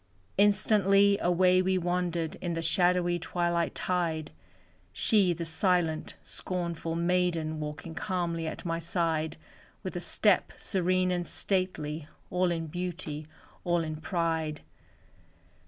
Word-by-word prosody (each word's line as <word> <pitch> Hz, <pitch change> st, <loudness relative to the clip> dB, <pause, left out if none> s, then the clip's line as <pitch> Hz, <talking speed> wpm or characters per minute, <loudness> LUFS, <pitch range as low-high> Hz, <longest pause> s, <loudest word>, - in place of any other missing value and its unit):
Instantly 200 Hz, -1 st, +4 dB
away 180 Hz, +1 st, +4 dB
we 185 Hz, 0 st, +1 dB
wandered 175 Hz, -2 st, -1 dB
In 175 Hz, -1 st, -3 dB
the 165 Hz, 0 st, -2 dB
shadowy 175 Hz, 0 st, +3 dB
twilight 170 Hz, 0 st, -1 dB
tide, 165 Hz, -4 st, -1 dB, 0.6 s
She, 205 Hz, -6 st, +3 dB
the 170 Hz, 0 st, -3 dB
silent, 165 Hz, -1 st, 0 dB
scornful 170 Hz, -2 st, -3 dB
maiden, 170 Hz, -2 st, 0 dB
Walking 150 Hz, +2 st, -6 dB
calmly 170 Hz, -3 st, -2 dB
at 160 Hz, -, -6 dB
my 165 Hz, 0 st, -1 dB
side, 165 Hz, -2 st, -1 dB, 0.5 s
With -, -, -5 dB
a -, -, -1 dB
step -, -, +2 dB
serene 185 Hz, -1 st, +1 dB
and 175 Hz, -1 st, -1 dB
stately, 160 Hz, -6 st, -2 dB, 0.2 s
All 180 Hz, 0 st, +2 dB
in 165 Hz, -1 st, -1 dB
beauty, 165 Hz, -2 st, -5 dB, 0.4 s
all 175 Hz, -1 st, +1 dB
in 155 Hz, -1 st, -4 dB
pride. 160 Hz, -2 st, -1 dB
175 Hz, 120 wpm, -29 LUFS, 165-180 Hz, 0.6 s, Instantly